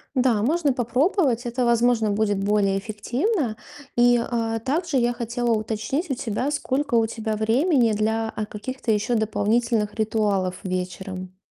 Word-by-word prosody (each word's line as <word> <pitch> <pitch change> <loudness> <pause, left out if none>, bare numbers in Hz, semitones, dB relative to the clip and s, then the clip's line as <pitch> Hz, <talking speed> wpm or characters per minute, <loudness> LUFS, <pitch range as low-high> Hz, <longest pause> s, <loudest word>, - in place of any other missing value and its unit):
Да, 250 -5 +3
можно 295 +3 +2
попробовать. 250 - +1
Это, 240 +1 -1
возможно, 235 -2 +3
будет 205 -1 +1
более 200 -1 +2
эффективно. 240 - -1 0.4
И, 245 0 +5
а, 230 -1 -1
также 295 +5 -1
я 240 -1 +2
хотела 240 0 -2
уточнить 225 - -1
у 270 - 0
тебя, 240 +3 -2
сколько 285 -2 -1
у 225 -1 +4
тебя 220 -1 -3
времени 235 - +2
для, 220 +1 0
а, 215 - -2
каких-то 230 +4 -4
еще 215 +3 +1
дополнительных 220 0 +1
ритуалов 205 -4 0
вечером? 185 0 -5
230 Hz, 140 wpm, -24 LUFS, 210-250 Hz, 0.4 s, И